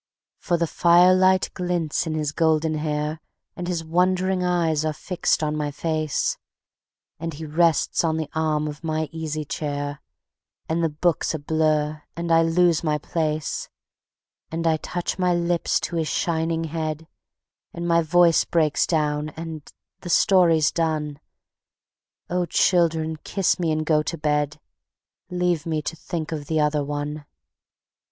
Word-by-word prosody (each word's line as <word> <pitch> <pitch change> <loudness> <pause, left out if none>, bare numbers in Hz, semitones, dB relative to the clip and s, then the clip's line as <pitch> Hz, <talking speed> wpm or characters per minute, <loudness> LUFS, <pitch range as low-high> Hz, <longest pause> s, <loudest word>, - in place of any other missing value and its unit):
For 175 - 0
the 170 - +1
firelight 185 +3 +4
glints 175 -3 -1
in 155 - -2
his 150 -2 -1
golden 160 0 +2
hair, 150 0 -2 0.3
And 175 - -5
his 175 -2 -2
wondering 185 +2 +1
eyes 170 -4 +1
are 155 -1 0
fixed 175 0 -1
on 150 0 0
my 150 -1 -1
face, 155 0 -1 0.8
And 165 -1 -4
he 160 +2 -7
rests 160 +1 +2
on 160 -1 +1
the 160 -2 -2
arm 155 -1 0
of 150 +1 -7
my 155 -1 -1
easy 155 -2 -4
chair, 145 +1 -4 0.7
And 165 +1 0
the 165 - +2
book's 160 +2 0
a - - -1
blur 155 0 0
and 170 0 -3
I 165 0 +6
lose 165 0 +3
my 150 -2 +1
place: 155 0 -2 0.8
And 165 +1 -3
I 160 -1 +3
touch 175 +3 -4
my 180 -1 +2
lips 170 0 +1
to 170 - -3
his 160 -1 0
shining 165 0 0
head, 160 0 -4 0.6
And 170 0 -5
my 170 0 +4
voice 170 +1 +4
breaks 155 -3 +1
down 150 -2 0
and 160 -2 -7 0.3
the 175 - -8
story's 170 -4 +4
done.... 155 -3 -1 1.1
Oh, 180 0 -1
children, 160 -2 +2
kiss 190 +5 0
me 165 -3 +1
and 155 0 -1
go 150 -1 +3
to 165 +3 -4
bed: 150 0 0 0.7
Leave 180 -3 0
me 160 -1 0
to 165 - -4
think 165 -1 -5
of 150 -3 -5
the 160 -1 0
Other 150 -1 +1
One. 145 +1 -4
160 Hz, 150 wpm, -23 LUFS, 150-170 Hz, 1.1 s, I